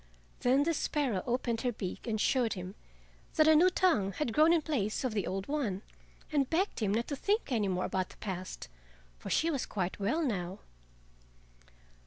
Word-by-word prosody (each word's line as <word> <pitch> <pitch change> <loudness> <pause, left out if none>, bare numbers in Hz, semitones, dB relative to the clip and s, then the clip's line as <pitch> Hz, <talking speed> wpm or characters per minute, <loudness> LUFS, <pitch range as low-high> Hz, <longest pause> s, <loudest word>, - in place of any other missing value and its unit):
Then 260 +3 +3
the 335 +2 +1
sparrow 275 - 0
opened 240 -2 0
her 250 - 0
beak 200 0 -6
and 220 -2 -1
showed 240 -1 +2
him 185 0 -6 0.6
that 310 -1 +5
a 315 - +7
new 350 +4 +6
tongue 230 - +2
had 245 -3 -2
grown 310 +5 +5
in 335 -2 +3
place 225 -10 -1
of 255 -4 -1
the 205 -4 -1
old 195 +1 -3
one, 235 -10 -2 0.5
and 280 -3 +1
begged 370 +5 0
him 210 -4 +1
not 230 +3 0
to 285 - -1
think 405 - 0
any 215 -5 +1
more 185 -1 0
about 185 -1 -1
the - - -15
past, 185 -2 -5 0.5
for - - -7
she 330 +1 +2
was 275 -5 -2
quite 185 -2 -3
well 235 +12 +1
now. 190 - -2
240 Hz, 190 wpm, -31 LUFS, 195-300 Hz, 0.6 s, a